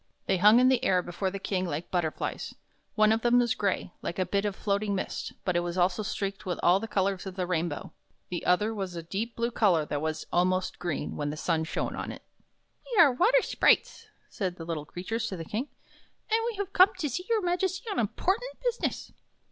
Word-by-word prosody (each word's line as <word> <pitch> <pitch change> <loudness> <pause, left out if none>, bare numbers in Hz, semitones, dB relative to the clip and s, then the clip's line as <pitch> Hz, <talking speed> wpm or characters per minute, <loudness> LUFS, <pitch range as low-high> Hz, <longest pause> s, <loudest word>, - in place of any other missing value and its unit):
They 195 - +2
hung 210 +6 +7
in 255 - +5
the 260 -2 +3
air 180 -1 +3
before 175 +2 -2
the 195 - -5
King 185 -1 -2
like 160 +1 -4
butterflies. 170 -4 -2 0.4
One 215 0 +5
of 225 +1 +2
them 240 +1 +4
was 240 -2 +3
gray, 195 -3 -1
like 170 - -4
a 185 - +1
bit 200 +2 0
of 205 -2 -1
floating 200 0 0
mist, 190 - -4
but 180 - 0
it - - +4
was 175 +1 -3
also 180 +2 +2
streaked 200 -1 -3
with 180 -2 -3
all 180 +2 +5
the 225 - -5
colors 195 -2 0
of 190 - -6
the 185 -2 -1
rainbow. 170 -3 -2 0.4
The 175 - -4
other 210 +5 +3
was 190 -4 -4
of 165 -1 -6
a - - -32
deep 225 +6 -3
blue 235 +1 -1
color 185 -9 +3
that 145 -1 -3
was 155 0 -3
almost 185 +1 +1
green 175 -4 -3
when 145 -1 -2
the 150 - -5
sun 160 0 0
shone - - -3
on - - -4
it. - - -10 0.3
" - - -45
We 450 - +2
are 310 -5 +8
water 475 - +4
sprites," - - +2 0.2
said 185 -4 -3
these 165 -2 -9
little 155 -3 -3
creatures 220 +8 -3
to 190 - -5
the 165 - -6
King, 225 - -3 0.3
" - - -30
and 445 - +4
we 465 - -5
have 400 -1 -4
come 370 +2 +7
to 305 - -1
see 360 +8 -4
your 445 -3 +2
Majesty 370 +4 -1
on 395 - -1
important 395 - 0
business." 485 -1 -2
195 Hz, 230 wpm, -28 LUFS, 175-240 Hz, 0.4 s, are